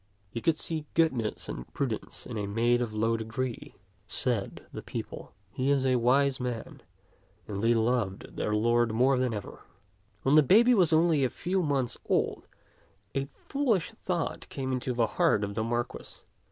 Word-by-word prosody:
" 100 -1 -38
He 115 - -3
could 160 +3 +2
see 155 -3 -4
goodness 130 -10 +1
and - - -7
prudence 125 -6 -3
in 120 - -6
a 105 -2 -2
maid 120 +4 +2
of 120 -3 -2
low 115 +2 +1
degree," 115 +2 -4 0.3
said 115 -6 -1
the - - -5
people; - - -7 0.2
"he 130 +5 -1
is 140 -2 +2
a 130 -1 +3
wise 135 +3 +3
man"; 125 -3 -5 0.7
and 100 0 -4
they 115 +1 +4
loved 115 -4 -1
their 105 - -1
lord 120 +1 +3
more 130 +3 +3
than 130 -1 +1
ever. 105 -3 -6 0.6
When 135 - +3
the 155 - +8
baby 225 - +6
was 180 -7 +4
only 160 -2 +4
a 130 - +2
few 185 +7 -1
months 140 -6 -1
old, - - 0 0.7
a 135 0 -1
fool 270 - -1
ish 185 +1 -3
thought 180 -7 -3
came 130 -1 -3
into 125 -1 -2
the 120 -1 +3
heart 105 -1 +2
of 100 0 -3
the 110 +1 -1
Marquis. 120 +1 -4
125 Hz, 180 wpm, -29 LUFS, 115-145 Hz, 0.7 s, the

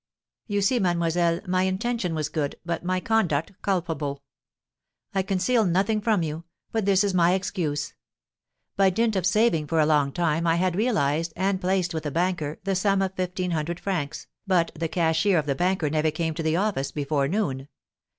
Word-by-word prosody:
You 205 -2 0
see, 245 +5 +2
mademoiselle, 170 -2 +1
my 185 0 +1
intention 190 -1 -1
was 155 -2 -1
good, 150 -2 -2
but 170 0 -3
my 185 +1 0
conduct 180 -6 +1
culpable. 160 -7 -2 0.9
I 195 - +2
conceal 195 +5 +1
nothing 200 +4 +1
from 210 -5 +2
you, 155 +1 -4 0.3
but 220 -3 -1
this 195 0 +4
is 200 -2 0
my 175 0 +4
excuse. 175 -6 -2 0.8
By 195 -1 +4
dint 220 +3 +1
of 185 -1 +1
saving 190 -6 +2
for 165 +2 +1
a 155 - +5
long 150 -2 +2
time 170 0 0
I 165 - +3
had 180 0 +1
realised, 165 - +1
and 190 +1 0
placed 185 -1 0
with 160 -1 -3
a - - 0
banker, 165 -1 -1
the 195 0 0
sum 195 +1 +2
of 190 0 -2
fifteen 180 -1 -2
hundred 165 +2 -2
francs, 175 -8 -3 0.2
but 175 -3 +2
the 165 +1 -3
cashier 170 +3 +2
of 155 - +1
the 140 - 0
banker 180 +1 0
never 155 +1 +1
came 160 +1 -2
to 165 - -4
the 160 0 +1
office 185 -8 0
before 145 -1 0
noon. 140 -7 -2
175 Hz, 185 wpm, -25 LUFS, 155-195 Hz, 0.9 s, a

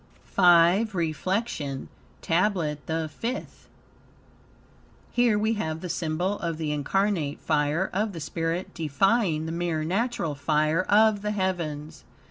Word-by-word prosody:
V 175 +4 +6
REFLECTION 165 - -2 0.4
TABLET 165 -4 0
THE 160 0 -1
FIFTH 230 - -6 1.4
Here 240 -3 +3
we 220 +2 +1
have 160 -7 -3
the 180 - -5
symbol 175 +5 -1
of 165 -2 -3
the 155 -2 -2
incarnate 155 +1 0
fire 155 +4 +1
of 205 +2 0
the 165 - -6
spirit 165 +3 -3
defying 165 - +1
the 160 - -4
mere 170 -2 -1
natural 190 -2 -1
fire 155 +3 +1
of 210 +1 +4
the 210 - -2
heavens. 170 -7 -3
170 Hz, 120 wpm, -26 LUFS, 155-200 Hz, 1.4 s, V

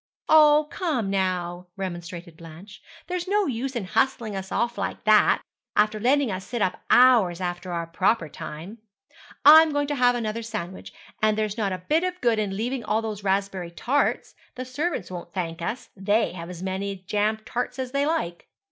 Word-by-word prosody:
'Oh, 305 -1 +6
come, 270 - -1
now,' 180 -2 -1
remonstrated 175 -2 -6
Blanche, 165 +5 -13 0.2
'there's 360 0 -4
no 410 +1 +2
use 265 -1 -3
in 225 -5 -2
hustling 225 +1 0
us 190 0 -6
off 235 0 0
like - - -4
that, 215 -1 +4 0.3
after 215 0 +2
letting 260 +1 +2
us 185 0 -4
sit 240 +3 -5
up 185 -3 -1
hours 235 -9 +5
after 175 0 -4
our 170 -1 -2
proper 175 +2 +1
time. 165 +9 -8 0.7
I'm 315 +2 +9
going 290 0 0
to - - 0
have 245 -2 +3
another 230 -1 -2
sandwich; 210 -5 -6 0.3
and 215 0 +3
there's 215 -1 -1
not 210 -4 -1
a 185 0 -6
bit 320 +3 +2
of 365 0 -2
good 235 -6 +2
in 195 -2 -2
leaving 245 +3 -2
all 220 +1 0
those 210 -2 -5
raspberry 195 -2 -1
tarts. 250 +11 0 0.2
The 255 - -5
servants 260 - -3
won't 175 -1 -8
thank 170 -2 -3
us. 230 +9 -4
They 205 +3 +1
have 170 -1 -8
as 180 0 -8
many 195 +1 -3
jam 205 +3 -1
tarts 245 +1 -3
as 260 -1 -4
they 280 +1 +1
like.' 175 - -2
215 Hz, 185 wpm, -25 LUFS, 185-255 Hz, 0.7 s, I'm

